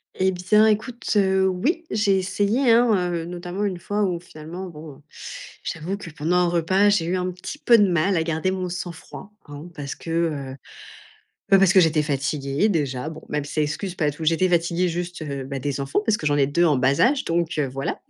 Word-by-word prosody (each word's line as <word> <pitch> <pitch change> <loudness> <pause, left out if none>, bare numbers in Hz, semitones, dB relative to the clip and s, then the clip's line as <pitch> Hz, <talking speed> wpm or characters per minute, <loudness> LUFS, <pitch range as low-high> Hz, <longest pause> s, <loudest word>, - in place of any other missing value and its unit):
Et 190 0 +2
bien, 200 +4 +3
écoute, 225 +3 -1
heu, 190 -1 +3
oui, 285 - -1
j'ai 200 -2 +2
essayé, 205 +7 +1
hein, 220 -7 +3
heu, 165 -1 -3
notamment 175 +3 -5
1 185 -3 -3
fois 205 +3 -1
où 180 -3 -1
finalement 170 +2 -9
bon, 150 -3 -11 0.6
j'avoue 175 +5 -4
que, 170 -5 -9
pendant 160 +4 -1
un 180 -1 +3
repas, 185 +4 +3
j'ai 205 -5 +2
eu 175 - -1
un 185 0 -1
petit 180 +11 -8
peu 235 -6 +5
de 205 - +5
mal 180 +2 +1
à 165 - +2
garder 165 +3 -1
mon 185 -1 -3
sang-froid 180 +3 -8 0.2
hein, 145 +3 -9
parce 140 -1 -5
que, 165 - -8
heu 150 -6 -1 1.0
bah, 195 - +7
parce 190 -2 +5
que 190 - +5
j'étais 160 -3 +4
fatiguée 140 +4 -1
déjà 145 -6 -1
bon, 160 0 -9
même 150 -1 -2
si 145 - -8
ça 155 - +1
excuse 175 +5 -3
pas 150 -5 0
tout. 155 +3 -7
J'étais 165 +4 +2
fatiguée 175 +1 +1
juste, 175 0 -4
heu, 140 -3 -4
beh, 135 0 -5
des 140 0 -3
enfants 135 +5 0
parce 220 -2 +2
que 150 - -6
j'en 145 -1 +2
ai 140 -1 +3
2 170 +4 +2
en 155 -4 +3
bas 130 +2 +2
âge, 270 +3 +3
donc, 170 -1 0
heu, 140 -3 +1
voilà. 135 +2 -4
175 Hz, 220 wpm, -23 LUFS, 150-190 Hz, 1.0 s, bah